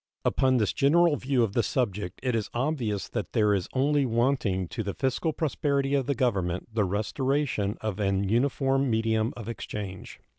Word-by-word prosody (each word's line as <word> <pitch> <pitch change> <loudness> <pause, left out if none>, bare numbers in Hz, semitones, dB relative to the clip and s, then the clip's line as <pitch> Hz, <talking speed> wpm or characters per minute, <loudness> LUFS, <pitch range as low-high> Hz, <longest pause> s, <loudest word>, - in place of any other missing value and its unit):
Upon 130 -1 +3
this 105 -4 +1
general 165 +3 +4
view 130 -3 +1
of 105 -4 -1
the 120 - +3
subject 105 -8 -2
it 125 -2 0
is 110 -2 -1
obvious 120 -7 -1
that - - -4
there 105 -3 +3
is 95 -3 -1
only 140 +2 +2
wanting 115 -6 +1
to 115 - -4
the 100 -2 -4
fiscal 135 +4 0
prosperity 140 -3 0
of 135 -3 +1
the 140 - +1
Government 95 -5 -1
the 110 -3 +2
restoration 110 +2 -1
of 110 -2 -3
an 100 -1 +1
uniform 135 +4 +1
medium 110 0 +1
of 115 -3 -7
exchange. 105 -4 -6
115 Hz, 175 wpm, -27 LUFS, 105-135 Hz, -, general